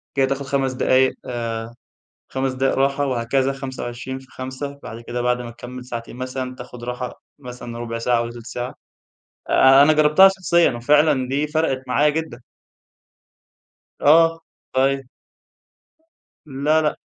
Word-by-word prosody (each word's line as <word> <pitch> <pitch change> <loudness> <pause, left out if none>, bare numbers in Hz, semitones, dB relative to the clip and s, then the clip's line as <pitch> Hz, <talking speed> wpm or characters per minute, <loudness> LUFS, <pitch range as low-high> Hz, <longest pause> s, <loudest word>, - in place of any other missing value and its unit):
كده 135 - +3
تاخد 135 +1 -2
5 135 -1 0
دقايق 130 +1 +3
آآ 115 -1 -4 0.6
5 135 0 -1
دقايق 130 +1 0
راحة 140 +1 +1
وهكذا 130 +2 0
25 130 -1 -6
في 130 - -16
خمسة. 130 +2 -6
بعد 115 +1 -8
كده 120 +1 -4
بعد 125 0 +1
ما 120 - -7
تكمل 125 +2 -9
ساعتين 120 -1 -7
مثلًا 130 0 -4
تاخد 125 -1 -10
راحة 125 0 -5 0.2
مثلًا 125 -3 -8
رُبع 115 -1 -4
ساعة 120 0 +1
والّا 120 0 -4
تلت 120 -1 -11
ساعة. 125 +1 -5 0.8
آآ 135 +1 +6
أنا 155 +2 +5
جربتها 155 +5 +6
شخصيًا 180 -3 +2
وفعلًا 135 +2 +3
دي 145 +3 0
فرقِت 150 -4 0
معايا 145 +4 +3
جدًا. 160 -3 -3 1.6
آه 165 +2 +5 0.3
طيب. 135 0 +1 1.4
لا 150 +2 +1
لا. 150 - 0
130 Hz, 140 wpm, -21 LUFS, 125-140 Hz, 1.6 s, آآ